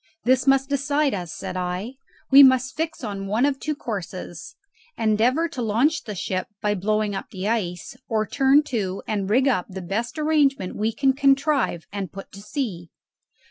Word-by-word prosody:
"This 255 +3 +2
must 270 0 +4
decide 285 +1 +1
us!" 175 -4 -4
said 185 -1 -6
I. 180 +6 -3 0.4
"We 275 +1 +10
must 260 -1 +5
fix 320 -3 -3
on 200 -3 -4
one 220 +6 +2
of 280 -2 0
two 305 -1 -2
courses: 195 - -6 0.4
endeavour 230 +9 +2
to 260 - -5
launch 245 +8 +1
the 210 -3 -5
ship 185 0 -3
by 210 -1 0
blowing 210 +1 0
up 195 - -5
the 190 +1 -5
ice, 180 -7 -2
or 220 -2 +1
turn 275 +5 +4
to 200 -9 -3
and 200 -2 -2
rig 260 +6 +3
up 200 -10 +1
the 190 0 -6
best 205 - -3
arrangement 290 -10 +1
we 215 +2 0
can 270 +3 +2
contrive 275 - +2
and 200 -3 -4
put 195 0 -10
to 200 - -11
sea." 205 - -4
225 Hz, 180 wpm, -23 LUFS, 195-275 Hz, 0.4 s, We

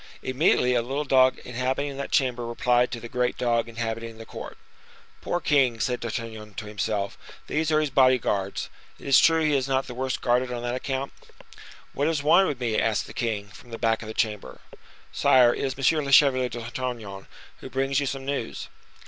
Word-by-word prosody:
Immediately 130 -2 +2
a 120 - +2
little 135 +5 -3
dog 130 -2 +4
inhabiting 130 +3 -2
that 140 - -4
chamber 125 -3 +1
replied 120 +1 +2
to 120 - -5
the 115 - -8
great 125 +1 -1
dog 115 -1 0
inhabiting 115 0 -5
the 115 - -10
court. - - -9 0.6
"Poor 175 - -1
king!" 135 -8 +2
said 125 +1 -1
D'Artagnan 110 -3 -6
to 110 - -6
himself, 105 -1 -3 0.3
"these 160 +1 -1
are 155 - +4
his 150 -2 -1
body 130 -1 +5
guards. 100 -4 -2 0.3
It - - -15
is 135 -2 +6
true 165 -1 +4
he 150 - +2
is 135 -1 0
not 135 0 0
the 125 - -8
worse 130 +1 -2
guarded 125 0 +1
on 120 -1 -4
that 120 0 -2
account." 135 +1 -3 0.8
"What 145 - 0
is 160 -3 -1
wanted 185 +6 +5
with 140 - -3
me?" 115 -3 0
asked 110 -2 0
the - - -11
king, 105 -4 -3
from 120 +5 -15
the 115 - -6
back 115 -1 +1
of 110 - -8
the 110 - -7
chamber. 105 - -2 0.5
"Sire, 125 -2 +5
it - - -4
is 135 +2 +4
M. 155 - 0
le 140 - -4
Chevalier 130 -3 +5
d'Artagnan, 120 -4 -6 0.3
who - - -9
brings 135 +1 0
you 140 - -1
some 135 0 -4
news." 140 - -4
125 Hz, 200 wpm, -25 LUFS, 115-135 Hz, 0.8 s, is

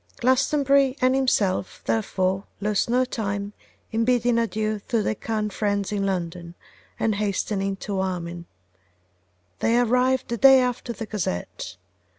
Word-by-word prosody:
Glastonbury 270 +1 +3
and 255 -1 +3
himself, 210 -9 0
therefore, 190 -3 0
lost 210 +1 0
no 250 +2 +3
time 200 -4 -3 0.4
in 225 0 +1
bidding 240 -1 +2
adieu 215 -2 -1
to 230 -3 +1
their - - 0
kind 215 -1 -3
friends 200 -2 -1
in 200 -1 0
London, 175 -2 -4 0.4
and 225 - +1
hastening 200 -1 -1
to 195 0 -4
Armine. 175 -2 -3 1.1
They 230 +1 +2
arrived 250 +2 +2
the 235 - -1
day 270 +1 +8
after 250 -1 -1
the 225 0 -5
Gazette. 185 - -4
215 Hz, 135 wpm, -24 LUFS, 195-250 Hz, 1.1 s, day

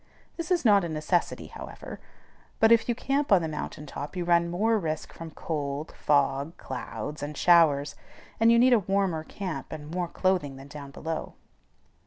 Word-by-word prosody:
This 335 0 -5
is 355 -6 +1
not 205 -3 +6
a 170 - -3
necessity, 155 +3 -1
however; - - -9 0.6
but 225 0 +5
if 230 +1 +5
you 240 - +2
camp 275 +3 -1
on 185 -4 +6
the - - -1
mountain 150 -1 -6
top 145 +3 -7
you 180 -1 -2
run 170 0 +3
more 215 +6 +2
risk 155 -4 -4
from 165 -1 -8
cold, 150 -2 -4
fog, 140 +1 +1
(clouds), 130 +2 -6
and 145 0 -5
showers, 150 -5 +4 0.5
and 225 +1 +6
you 235 - +6
need 250 +2 +6
a 235 - +6
warmer 195 -4 0
camp 185 +1 -6
and 150 -1 -7
more 175 0 -1
clothing 180 -6 0
than 135 +1 -12
down 140 -1 -9
below. 160 +3 -5
165 Hz, 180 wpm, -27 LUFS, 150-200 Hz, 0.6 s, not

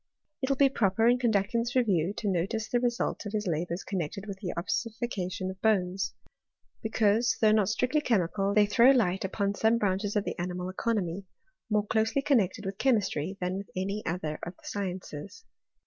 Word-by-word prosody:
It 265 - -1
will 275 - +1
be 280 - +6
proper 225 -4 +2
in 245 +1 +4
conducting 225 -1 +1
this 240 +2 -4
review 195 -9 +2
to 215 - -3
notice 195 +4 -1
the 245 - +1
result 240 -1 -1
of 205 - -7
his 210 0 -1
labours 170 +1 -2
connected 190 +1 -4
with 200 -2 -7
the 185 -4 -3
ossification 190 -1 -2
of 190 - -13
bones; 195 -3 +1 0.7
because, 225 +1 +2
though 215 -1 +5
not 215 -2 +3
strictly 250 +7 +1
chemical, 200 - +1
they 210 -1 +6
throw 235 +5 +5
light 195 -9 +3
upon 200 +1 -1
some 220 +3 +2
branches 200 0 0
of 205 - +2
the - - -5
animal 180 +1 -3
economy, 190 -2 -2 0.4
more 210 -1 +2
closely 220 +5 +1
connected 210 -7 +1
with 195 0 -5
chemistry 195 - +1
than 180 +1 -2
with 200 - -9
any 195 +3 -2
other 160 -3 -3
of 175 +2 -6
the - - -21
sciences. 185 -3 -5
200 Hz, 180 wpm, -29 LUFS, 185-225 Hz, 0.7 s, be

